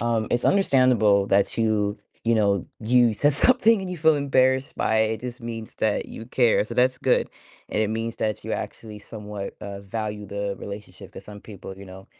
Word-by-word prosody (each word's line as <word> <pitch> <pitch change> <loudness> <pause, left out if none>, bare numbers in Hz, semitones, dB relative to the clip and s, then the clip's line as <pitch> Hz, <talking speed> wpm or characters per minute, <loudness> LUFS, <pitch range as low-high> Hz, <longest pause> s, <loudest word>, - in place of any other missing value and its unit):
Um, 115 -2 0
it's 120 - 0
understandable 125 - +4
that 100 +3 +1
you, 105 -2 +1 0.2
you 115 0 +2
know, 100 -3 +2
you 120 +1 +3
said 145 +7 +2
something 230 - +4
and 190 -1 -5
you 180 - -4
feel 160 -1 +4
embarrassed 130 -2 +1
by 110 - +1
it, 110 0 +2
it 110 - -9
just 125 +1 -7
means 115 -2 -7
that 110 -2 0
you 115 - -9
care, 120 -1 +2
so 110 +3 -8
that's 125 +1 +3
good. - - +1 0.4
And 110 - +1
it 105 - 0
means 115 +1 -3
that 110 -2 -2
you - - -4
actually 105 -2 -6
somewhat, 105 -2 -7
uh, 100 -1 -7
value 105 +1 -5
the 100 0 -3
relationship, 100 +1 -9
'cause - - -11
some 105 -1 -11
people, 95 -3 -10
you 100 - -11
know, 95 0 -12
110 Hz, 200 wpm, -24 LUFS, 105-125 Hz, 0.4 s, understandable